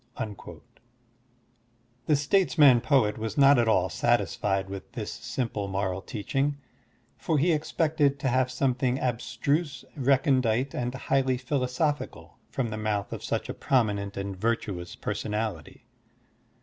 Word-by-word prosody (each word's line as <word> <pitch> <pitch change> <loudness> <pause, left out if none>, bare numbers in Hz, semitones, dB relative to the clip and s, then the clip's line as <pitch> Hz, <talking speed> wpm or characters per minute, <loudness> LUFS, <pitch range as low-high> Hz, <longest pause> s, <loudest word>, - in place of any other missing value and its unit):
*'^ 105 -3 -7 1.5
The 150 - +4
statesman 145 - +4
poet 115 -8 +2
was 110 +4 -4
not 140 -1 +6
at 120 - +2
all 110 - +3
satisfied 95 -1 0
with 95 -1 -8
this - - -5
simple 110 -6 -3
moral 95 -1 -2
teaching, 135 +8 -2 0.6
for 160 - 0
he 165 +5 +3
expected 150 -2 +1
to 140 - -2
have 130 0 +2
something 125 0 0
abstruse, 140 +4 -1
recondite, 130 -2 +2
and 125 +1 -3
highly 135 -1 +1
philosophical 135 +3 -2
from 120 -4 -2
the 110 - -4
mouth 105 -2 -2
of - - -6
such - - -2
a - - -4
promi 120 -6 +2
nent 100 0 -6
and 100 0 -4
virtuous 100 -4 -2
personality. 105 -7 -4
125 Hz, 130 wpm, -27 LUFS, 105-140 Hz, 1.5 s, not